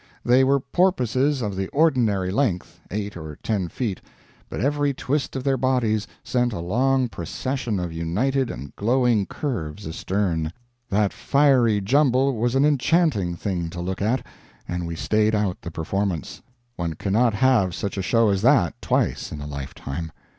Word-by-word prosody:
They 125 +2 +5
were 140 +1 +3
porpoises 135 - +1
of 100 -2 -2
the 95 0 -2
ordinary 120 - +2
length 105 -6 -1
eight 105 +1 -4
or 80 -3 -8
ten 100 -5 0
feet 105 0 -3 0.5
but - - -5
every 145 +3 +1
twist 140 +3 -2
of 130 - -3
their 135 -1 +2
bodies 120 -5 +1 0.2
sent 125 -2 0
a 100 - -4
long 125 +9 +1
procession 125 -3 -3
of 90 -2 -4
united 120 +12 0
and 70 +3 -8
glowing 120 -2 +2
curves 105 - -4
astern. 80 -1 -1 0.4
That 105 -1 +1
fiery 130 -7 +3
jumble 135 +3 +3
was 120 +3 0
an 135 +2 +4
enchanting 145 - +2
thing 85 -2 -3
to 85 - -7
look 90 +2 -3
at, 115 +6 0 0.4
and 90 -1 -3
we 85 - -4
stayed 110 +5 +1
out 105 -3 -1
the - - -6
performance; 85 +1 -3 0.4
one 85 -2 -2
cannot 110 +5 +1
have 115 -7 +3
such 100 - -3
a 100 - -2
show 115 +4 +3
as 100 -1 +1
that 120 - +3
twice - - 0
in 75 - -6
a 75 - -6
lifetime. 70 +2 -6
105 Hz, 160 wpm, -23 LUFS, 90-130 Hz, 0.5 s, They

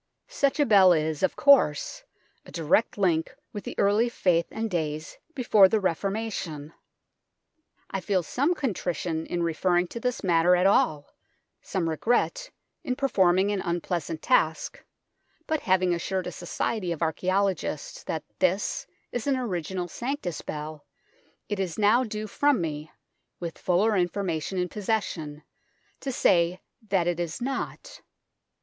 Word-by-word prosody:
Such 285 - 0
a 290 - +5
bell 195 -6 +7
is, 155 -2 -1
of 190 - +1
course, 280 - +3 0.4
a - - -14
direct 170 +8 +1
link 180 +2 +1 0.2
with 205 - -6
the - - -6
early 210 +4 +3
faith 175 -7 +1
and 225 +1 -3
days 155 -5 -3 0.2
before 215 -7 +5
the 220 - +2
Reformation. 190 -5 -3 1.2
I 195 - -1
feel 185 -2 0
some 280 - 0
contrition 175 - -2
237 175 - -2
in - - 0
referring 175 +2 +1
to 235 - -6
this 250 -1 -2
matter 175 -1 +4
at 180 +1 +2
all, 155 -7 +2 0.5
some 180 -4 -2
regret 245 - 0 0.3
in 255 -5 -1
performing 195 -7 +3
an 200 -2 -1
unpleasant 170 -2 -3
task, 160 0 +1 0.6
but 315 -1 0
having 185 -1 +2
assured 185 +2 -2
a 180 - -4
society 180 +3 -3
of 170 0 -2
archaeologists 195 - -1
that - - -3 0.2
this - - 0 0.2
is 245 +2 -3
an 275 -2 +2
original 185 -6 -3
Sanctus 240 - -4
Bell, 150 0 -6 0.6
it 205 -2 -3
is 185 -4 -2
now 215 +4 +4
due 215 -2 -4
from 285 +5 +2
me, 155 -2 -4 0.5
with 170 -2 -5
fuller 200 +5 +2
information 180 -1 -1
in 180 0 0
possession, 180 -8 -3 0.6
to 270 - -3
say 175 -6 +2 0.3
that 190 -3 +2
it 175 -1 -1
is 170 +3 -3
not. 275 - -5
185 Hz, 145 wpm, -26 LUFS, 170-225 Hz, 1.2 s, bell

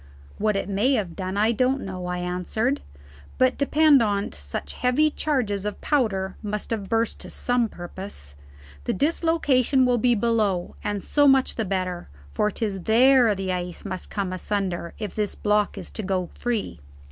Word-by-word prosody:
"What 215 0 +1
it 195 - -1
may 205 +7 +2
have 190 -9 -1
done, 185 +1 -4
I 215 +2 +3
don't 255 +4 +1
know," 185 -2 -5
I 180 0 -2
answered; 180 +9 -1 0.6
"but 255 0 +3
depend 295 -1 +5
on't 205 -2 0
such 70 0 -5
heavy 295 +5 +2
charges 240 -11 -1
of 210 -1 -4
powder 195 -10 0
must 210 +1 -4
have 205 -4 -3
burst 225 0 0
to - - -9
some 245 -2 0
purpose. 175 - -8 0.5
The - - 0
dislocation 280 - +2
will 245 -1 +2
be 245 +1 +3
below; 210 -5 0
and 205 -2 -2
so 290 -1 +3
much 270 -1 +4
the 225 - -2
better, 185 - -3 0.2
for 210 - +1
'tis 200 -2 -3
there 245 -1 +5
the 190 -1 -2
ice 180 +1 -4
must 185 -2 -5
come 195 -3 -2
asunder 185 -3 -3
if 210 -3 -5
this 210 -2 -2
block 210 0 +1
is - - -8
to - - -5
go 185 -3 -2
free." 220 - -3
210 Hz, 170 wpm, -24 LUFS, 190-250 Hz, 0.6 s, depend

